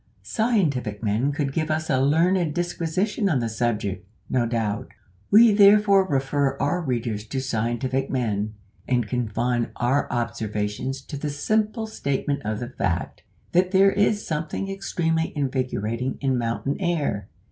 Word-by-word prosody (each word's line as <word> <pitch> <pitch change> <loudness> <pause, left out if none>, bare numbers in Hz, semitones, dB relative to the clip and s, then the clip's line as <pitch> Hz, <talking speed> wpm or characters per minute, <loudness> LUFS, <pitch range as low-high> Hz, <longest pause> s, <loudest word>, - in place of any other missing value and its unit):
Scientific 150 - 0
men 110 +6 +1
could 140 -2 -2
give 155 0 -1
us 155 0 -1
a 130 -4 +2
learned 165 +3 +2
disquisition 175 +4 -1
on 155 - +2
the 120 -2 -1
subject, 105 -4 -2 0.3
no 120 -2 +2
doubt; 115 0 -2 0.4
we 225 +2 +7
therefore 200 -1 +6
refer 140 -1 0
our 175 +6 0
readers 120 -7 -2
to 135 - -3
scientific 130 +2 -1
men, 110 -4 -1 0.3
and 120 -4 +1
confine 120 0 -1
our 130 +4 0
observations 115 +2 -2
to 145 - -7
the 150 +1 -3
simple 215 - 0
statement 140 -8 -2
of 105 0 -2
the 120 - -5
fact, 90 -9 -2 0.3
that 180 +1 +3
there 195 +1 +5
is 205 +1 +1
something 165 +5 -3
extremely 165 -4 -1
invigorating 125 -3 -1
in 135 -2 +1
mountain 120 +3 -1
air. 145 - -1
135 Hz, 140 wpm, -24 LUFS, 120-170 Hz, 0.4 s, we